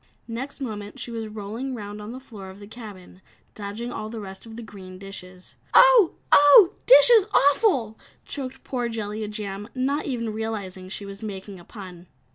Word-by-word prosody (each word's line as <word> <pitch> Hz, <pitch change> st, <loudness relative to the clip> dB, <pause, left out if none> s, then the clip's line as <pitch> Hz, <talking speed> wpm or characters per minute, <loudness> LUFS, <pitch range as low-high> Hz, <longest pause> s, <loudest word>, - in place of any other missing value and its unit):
Next 250 Hz, +6 st, -6 dB
moment 210 Hz, -6 st, -6 dB
she 240 Hz, -, -6 dB
was 225 Hz, -1 st, -4 dB
rolling 220 Hz, +5 st, -5 dB
round 210 Hz, -1 st, -7 dB
on 210 Hz, +2 st, -7 dB
the 255 Hz, -, -7 dB
floor 210 Hz, -7 st, -11 dB
of 190 Hz, +1 st, -12 dB
the 205 Hz, -, -10 dB
cabin, 205 Hz, -5 st, -11 dB, 0.3 s
dodging 215 Hz, +4 st, -6 dB
all 215 Hz, -2 st, -5 dB
the 225 Hz, 0 st, -6 dB
rest 195 Hz, +1 st, -9 dB
of 225 Hz, -, -10 dB
the 235 Hz, -, -7 dB
green 185 Hz, -4 st, -11 dB
dishes. 185 Hz, -1 st, -10 dB, 0.2 s
"Oh! -, -, +7 dB, 0.2 s
Oh! 315 Hz, +7 st, +8 dB
Dishes 475 Hz, -4 st, +8 dB
awful!" 275 Hz, -, +3 dB, 0.3 s
choked 265 Hz, -3 st, -6 dB
poor 245 Hz, -3 st, -2 dB
Jellia 215 Hz, -1 st, -4 dB
Jam, 205 Hz, 0 st, -6 dB
not 275 Hz, +4 st, -1 dB
even 230 Hz, -5 st, -2 dB
realizing 200 Hz, -4 st, -5 dB
she 200 Hz, +1 st, -6 dB
was 200 Hz, +1 st, -9 dB
making 195 Hz, -2 st, -7 dB
a -, -, -13 dB
pun. 180 Hz, -3 st, -11 dB
215 Hz, 175 wpm, -25 LUFS, 200-250 Hz, 0.3 s, Oh